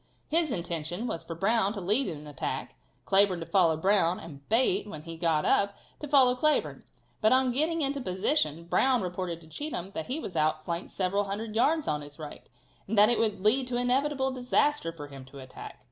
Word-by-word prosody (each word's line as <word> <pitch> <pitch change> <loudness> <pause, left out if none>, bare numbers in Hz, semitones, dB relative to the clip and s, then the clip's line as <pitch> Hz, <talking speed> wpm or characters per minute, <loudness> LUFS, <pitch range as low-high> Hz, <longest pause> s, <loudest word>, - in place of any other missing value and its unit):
His 325 -2 +1
intention 170 +2 -3
was 165 - -3
for 165 - -7
Brown 205 +3 +1
to 205 - -5
lead 210 +8 +2
in 155 - -4
an 150 - -11
attack, 145 -2 -4 0.3
Cleburne 195 -2 +3
to 165 - -6
follow 170 -5 +3
Brown, 185 0 +2
and 140 -4 -12
Bate, 255 - +2
when 155 -7 -8
he 165 0 -7
got 160 -2 0
up, 200 0 +2 0.2
to 300 - -6
follow 270 -3 +5
Cleburne. 305 +4 0 0.4
But 215 - +4
on 260 -1 +3
getting 315 +6 +1
into 280 -1 0
position 185 - 0
Brown 250 +7 +2
reported 180 -2 -4
to 160 - -15
Cheatham 195 - -5
that 160 -6 -5
he 275 +5 -2
was 195 - -7
out 155 0 0
flanked 170 +1 -4
several 200 +2 -1
hundred 215 +2 -5
yards 300 +7 +2
on 150 -1 -1
his 145 0 -10
right, 150 -2 -10 0.4
and 215 +2 -2
that 210 +2 +7
it 240 - +2
would 215 -4 0
lead 250 +4 +3
to 245 -1 -2
inevitable 265 +2 +1
disaster 255 - +1
for 160 -3 -9
him 140 -2 -11
to 135 +2 -14
attack. 130 -1 -10
200 Hz, 205 wpm, -28 LUFS, 165-255 Hz, 0.4 s, that